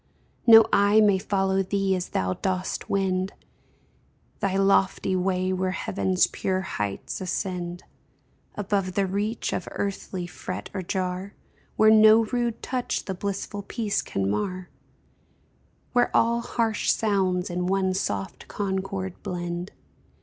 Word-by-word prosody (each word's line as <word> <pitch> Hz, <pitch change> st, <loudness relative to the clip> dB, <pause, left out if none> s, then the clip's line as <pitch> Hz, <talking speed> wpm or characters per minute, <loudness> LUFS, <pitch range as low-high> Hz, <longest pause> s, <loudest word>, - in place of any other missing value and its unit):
No 225 Hz, -1 st, +10 dB
eye 205 Hz, +2 st, +5 dB
may 205 Hz, -3 st, +4 dB
follow 195 Hz, 0 st, +1 dB
thee 195 Hz, 0 st, 0 dB
as 180 Hz, -1 st, -4 dB
thou 95 Hz, 0 st, 0 dB
dost 185 Hz, -, -3 dB
wend 190 Hz, -1 st, 0 dB, 1.1 s
Thy 195 Hz, -1 st, 0 dB
lofty 195 Hz, -1 st, +2 dB
way 185 Hz, 0 st, 0 dB
where 185 Hz, 0 st, 0 dB
heaven's 185 Hz, 0 st, +1 dB
pure 185 Hz, 0 st, -2 dB
heights 105 Hz, -, -4 dB
ascend 180 Hz, -1 st, -3 dB, 0.7 s
Above 195 Hz, -2 st, -1 dB
the 200 Hz, -, +2 dB
reach 205 Hz, +4 st, -2 dB
of 180 Hz, -, -3 dB
earthly 195 Hz, -2 st, -3 dB
fret 180 Hz, +1 st, -7 dB
or 190 Hz, -, -3 dB
jar, 185 Hz, +1 st, -3 dB, 0.4 s
Where 215 Hz, 0 st, +6 dB
no 220 Hz, +1 st, +7 dB
rude 235 Hz, 0 st, -2 dB
touch 250 Hz, -1 st, -2 dB
the 190 Hz, -, -3 dB
blissful 200 Hz, +2 st, -4 dB
peace 210 Hz, 0 st, -2 dB
can 95 Hz, 0 st, -2 dB
mar, 180 Hz, -, -2 dB, 1.2 s
Where 245 Hz, -1 st, +3 dB
all 235 Hz, +1 st, +2 dB
harsh 230 Hz, -2 st, -1 dB
sounds 190 Hz, -4 st, +1 dB
in 180 Hz, +1 st, -1 dB
one 190 Hz, 0 st, +1 dB
soft 100 Hz, -, -3 dB
concord 190 Hz, -1 st, -3 dB
blend. 175 Hz, +1 st, -4 dB
190 Hz, 130 wpm, -25 LUFS, 185-205 Hz, 1.2 s, No